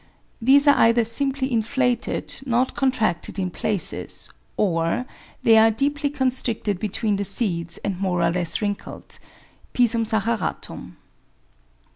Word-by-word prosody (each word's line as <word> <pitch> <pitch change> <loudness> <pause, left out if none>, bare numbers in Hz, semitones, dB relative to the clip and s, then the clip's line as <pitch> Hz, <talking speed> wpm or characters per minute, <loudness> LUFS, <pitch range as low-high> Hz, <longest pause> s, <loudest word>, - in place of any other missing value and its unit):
These 280 +5 +5
are 285 - +8
either 230 0 +4
simply 270 +3 +1
inflated, 245 +2 -1
not 250 +1 +1
contracted 225 -12 -1
in 185 -2 -2
places; 200 +1 -3 0.3
or 165 +3 0 0.4
they 225 -1 +6
are 225 +1 +6
deeply 285 +6 -1
constricted 255 -8 -1
between 210 0 -1
the 200 - -1
seeds 175 -5 0
and 195 -3 -3
more 180 -3 0
or 170 - +2
less 175 +3 -2
wrinkled 205 -1 -5 0.5
(P. 245 - +4
saccharatum) 225 -1 -2
225 Hz, 120 wpm, -23 LUFS, 195-255 Hz, 0.5 s, are